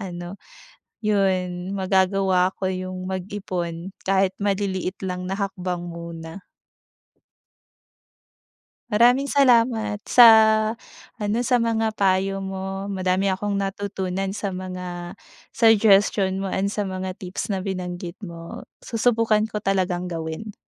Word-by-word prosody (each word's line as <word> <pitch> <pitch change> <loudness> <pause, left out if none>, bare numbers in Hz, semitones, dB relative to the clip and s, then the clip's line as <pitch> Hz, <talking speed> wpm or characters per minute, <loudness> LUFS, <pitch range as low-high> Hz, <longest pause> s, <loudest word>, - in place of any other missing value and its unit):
ano, 175 -1 -6 0.7
'yon 190 -3 0
magagawa 190 -1 +2
ko 190 - 0
'yong 185 0 -4
mag-ipon 185 -2 -4
kahit 190 0 +2
maliliit 195 -1 -1
lang 180 -1 -3
na 195 +2 -4
hakbang 185 -3 -3
muna. 170 +1 -8 2.5
Maraming 245 +5 +4
salamat 230 -6 +3
sa 245 -1 +8 0.9
ano, 210 +1 -1
sa 245 0 +2
mga 225 -1 +1
payo 195 0 +2
mo, 195 0 -5
madami 185 -1 0
akong 200 +1 -1
natutunan 195 -1 -3
sa 200 -1 -4
mga 180 -1 -6 0.3
suggestion 205 -4 +4
mo 195 - -3
and 195 +1 -1
sa 205 -1 -2
mga 185 0 -5
tips 185 +3 -5
na 195 - 0
binanggit 180 -2 -4
mo, 170 +5 -8 0.2
susubukan 230 -2 +1
ko 210 - -2
talagang 185 -3 0
gawin. 165 +5 -5
190 Hz, 110 wpm, -23 LUFS, 185-205 Hz, 2.5 s, sa